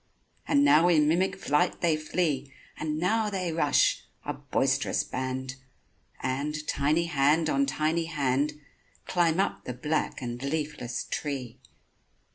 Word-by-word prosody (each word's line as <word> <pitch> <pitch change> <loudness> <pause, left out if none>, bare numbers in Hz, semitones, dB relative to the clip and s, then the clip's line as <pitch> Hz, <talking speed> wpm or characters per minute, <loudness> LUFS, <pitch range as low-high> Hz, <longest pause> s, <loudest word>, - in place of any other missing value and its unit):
And 285 0 +4
now 175 - +6
in 155 -4 +4
mimic 175 +5 +2
flight 175 0 0
they 165 -3 +3
flee, 155 -3 -1 0.3
And 155 -1 -2
now 215 +5 +1
they 185 -4 -2
rush, 150 -3 +3 0.2
a - - -2
boisterous - - 0
band— 130 0 -4 0.7
And, 150 +4 -2
tiny 150 +4 +1
hand 155 0 +2
on 140 0 +2
tiny 155 +3 0
hand, 145 -2 0 0.5
Climb 175 -1 +2
up 195 - -1
the 125 - -4
black 150 +5 -1
and 120 -2 -5
leafless 145 -3 -3
tree. 135 -6 -4
150 Hz, 130 wpm, -28 LUFS, 140-170 Hz, 0.7 s, now